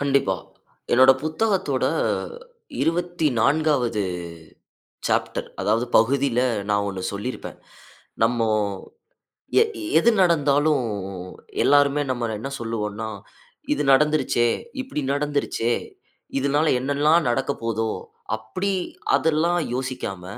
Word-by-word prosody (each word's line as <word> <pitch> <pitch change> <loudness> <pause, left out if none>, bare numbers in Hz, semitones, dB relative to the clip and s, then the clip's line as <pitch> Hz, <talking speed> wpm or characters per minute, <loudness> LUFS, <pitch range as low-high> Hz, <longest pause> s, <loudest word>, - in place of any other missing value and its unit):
கண்டிப்பா. 140 -9 +2 0.6
என்னோட 130 +2 +7
புத்தகத்தோட 195 +5 0 1.0
24வது 150 -7 +1 1.1
சாப்டர். - - -1
அதாவது 115 +4 +1
பகுதில, 130 +2 +2 0.3
நான் 105 0 +2
1 95 -1 -5
சொல்லியிருப்பேன் 105 +6 -6 0.6
நம்ம 115 -1 +2 1.1
எ - - +8 0.3
எது 235 - +5
நடந்தாலும், 145 -4 +3 0.8
எல்லாருமே 145 0 +4
நம்மள 120 -3 -2
என்ன 135 +5 -5
சொல்லுவோனா, 110 -1 -3 0.7
இது - - -1
நடந்துருச்சே! 150 -4 +3 0.3
இப்டி 255 - -4
நடந்துருச்சே! 145 -5 0 0.6
இதனால 145 +3 +1
என்னெல்லாம் 145 +3 +2
நடக்க 135 +3 0
போதோ? 115 -1 -1 0.5
அப்டி 185 - -3 0.4
அதெல்லாம் 165 +2 +2 0.2
யோசிக்காம, 125 -8 -4
140 Hz, 85 wpm, -23 LUFS, 115-150 Hz, 1.1 s, எ